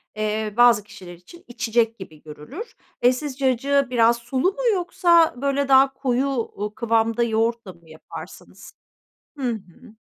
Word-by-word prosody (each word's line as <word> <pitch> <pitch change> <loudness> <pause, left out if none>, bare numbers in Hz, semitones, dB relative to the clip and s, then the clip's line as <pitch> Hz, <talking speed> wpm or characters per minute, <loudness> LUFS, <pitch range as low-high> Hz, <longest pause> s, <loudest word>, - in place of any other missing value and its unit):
eee, 215 0 -2
bazı 240 -4 +5
kişiler 180 -4 -12
için 180 - -16
içecek 230 -2 -1
gibi 155 -5 -11
görülür. 255 - -10 0.3
Eee, 250 +1 +5
siz 275 0 -6
cacığı 275 +1 +1
biraz 235 -1 +3
sulu 260 +9 -1
mu - - -7
yoksa, 345 -2 +3
böyle, 280 0 0
daha 270 0 +5
koyu, 265 -1 -1
ııı, 210 0 -4
kıvamda 230 0 +1
yoğurtla 225 -3 -1
mı 170 -1 -23
yaparsınız? 155 0 -12 0.6
Hı 275 - -6
hı. 220 +2 -9
235 Hz, 145 wpm, -22 LUFS, 215-275 Hz, 0.6 s, bazı